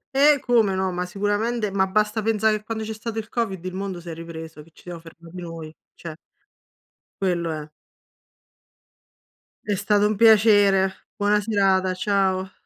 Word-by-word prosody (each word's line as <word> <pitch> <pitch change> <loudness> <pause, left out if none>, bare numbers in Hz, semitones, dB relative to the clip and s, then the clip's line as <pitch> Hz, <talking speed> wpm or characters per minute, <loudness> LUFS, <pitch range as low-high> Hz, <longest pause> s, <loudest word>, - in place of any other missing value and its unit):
Eh, 285 0 +5
come 225 -7 +2
no, 190 0 -1
ma 180 0 -3
sicuramente. 205 +3 -1
Ma 190 -1 +1
basta 215 +3 0
pensare 220 0 +1
che 210 - -15
quando 220 0 -4
c'è 220 0 -5
stato 220 +1 -6
il 215 0 -5
COVID, 195 -7 -3
il 185 - -4
mondo 190 -2 -5
s'è 170 -1 -8
ripreso, 160 -1 -9
che 155 - -18
ci - - -20
siamo 175 -1 -8
fermati 165 +1 -14
noi, 165 -2 -8 0.2
cioè 160 -2 -8 1.1
quello 175 -3 0
è. 155 -1 -6 2.0
È 205 - 0
stato 205 +2 +2
un 210 -1 -2
piacere. 205 -4 +4
Buona 205 +1 +2
serata. 195 -3 +1
Ciao. 190 -1 0
195 Hz, 155 wpm, -23 LUFS, 180-215 Hz, 2.0 s, Eh